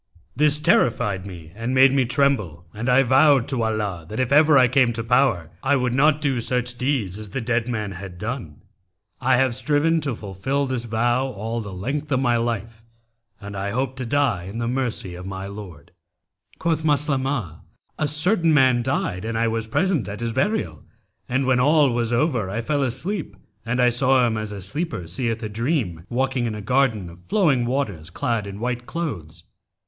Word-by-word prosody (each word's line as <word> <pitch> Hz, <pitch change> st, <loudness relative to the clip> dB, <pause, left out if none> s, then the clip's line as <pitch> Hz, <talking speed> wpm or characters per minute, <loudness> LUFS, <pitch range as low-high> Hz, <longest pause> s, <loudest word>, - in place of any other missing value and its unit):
This 150 Hz, +2 st, +3 dB
terrified 105 Hz, -9 st, +1 dB
me 85 Hz, -4 st, -10 dB
and 115 Hz, +4 st, -3 dB
made 130 Hz, 0 st, +6 dB
me 135 Hz, -2 st, +3 dB
tremble, 120 Hz, -, 0 dB
and 115 Hz, +4 st, -3 dB
I 130 Hz, +2 st, +5 dB
vowed 135 Hz, 0 st, +4 dB
to 130 Hz, -4 st, -1 dB
Allah, 105 Hz, -6 st, -2 dB
that 110 Hz, -, -5 dB
if 130 Hz, 0 st, 0 dB
ever 150 Hz, 0 st, +6 dB
I 130 Hz, -1 st, +6 dB
came 125 Hz, -1 st, +3 dB
to 115 Hz, 0 st, -3 dB
power, 115 Hz, -, +2 dB
I 140 Hz, +1 st, +2 dB
would 125 Hz, -2 st, 0 dB
not 150 Hz, +3 st, +3 dB
do 135 Hz, -5 st, 0 dB
such 125 Hz, +1 st, -1 dB
deeds 120 Hz, -7 st, -1 dB
as 105 Hz, -1 st, -7 dB
the 135 Hz, -, -3 dB
dead 115 Hz, -1 st, -1 dB
man 110 Hz, -4 st, -3 dB
had 95 Hz, -1 st, -8 dB
done. 105 Hz, -, -6 dB, 0.6 s
I 130 Hz, 0 st, +3 dB
have 130 Hz, -1 st, +2 dB
striven 155 Hz, +4 st, +1 dB
to 140 Hz, -5 st, -2 dB
fulfil 110 Hz, +8 st, -2 dB
this 130 Hz, -3 st, -3 dB
vow 120 Hz, +3 st, +1 dB
all 115 Hz, 0 st, -4 dB
the 100 Hz, -2 st, -7 dB
length 135 Hz, +11 st, -4 dB
of 130 Hz, -, +2 dB
my 120 Hz, -2 st, +2 dB
life 115 Hz, -1 st, -3 dB, 0.6 s
and 100 Hz, 0 st, -8 dB
I 100 Hz, +1 st, -3 dB
hope 130 Hz, +4 st, -2 dB
to 130 Hz, -, -3 dB
die 125 Hz, -9 st, +1 dB
in 100 Hz, +4 st, -7 dB
the 115 Hz, 0 st, -2 dB
mercy 120 Hz, -7 st, -2 dB
of 90 Hz, +1 st, -8 dB
my 95 Hz, 0 st, -5 dB
Lord.' 100 Hz, -7 st, -10 dB, 0.7 s
Quoth 160 Hz, -1 st, -1 dB
Maslamah, 135 Hz, -, 0 dB, 0.4 s
'A 155 Hz, -, +1 dB
certain 165 Hz, +4 st, +2 dB
man 130 Hz, -4 st, +4 dB
died 115 Hz, -7 st, -2 dB
and 115 Hz, 0 st, -3 dB
I 115 Hz, +1 st, +2 dB
was 115 Hz, -1 st, -2 dB
present 165 Hz, -, 0 dB
at 100 Hz, +3 st, -6 dB
his 115 Hz, -1 st, -2 dB
burial, 205 Hz, -, -1 dB, 0.5 s
and 130 Hz, +2 st, +1 dB
when 130 Hz, -1 st, +3 dB
all 145 Hz, +1 st, +4 dB
was 120 Hz, -1 st, 0 dB
over 120 Hz, -, +1 dB
I 105 Hz, +4 st, -2 dB
fell 145 Hz, +4 st, -1 dB
asleep 135 Hz, -, -2 dB, 0.3 s
and 120 Hz, +2 st, -2 dB
I 125 Hz, -1 st, +5 dB
saw 130 Hz, +1 st, +3 dB
him 115 Hz, -2 st, 0 dB
as 110 Hz, -1 st, -4 dB
a 100 Hz, -2 st, -7 dB
sleeper 145 Hz, -, -4 dB
seeth 115 Hz, +5 st, -2 dB
a -, -, -2 dB
dream, 110 Hz, -, -2 dB
walking 130 Hz, 0 st, 0 dB
in 110 Hz, -, -3 dB
a -, -, -6 dB
garden 115 Hz, -4 st, +1 dB
of 85 Hz, +1 st, -12 dB
flowing 135 Hz, -, +2 dB
waters 110 Hz, -, -2 dB
clad 115 Hz, -7 st, -2 dB
in 100 Hz, 0 st, -7 dB
white 120 Hz, +1 st, -3 dB
clothes. 140 Hz, -, -5 dB
120 Hz, 195 wpm, -23 LUFS, 105-135 Hz, 0.7 s, made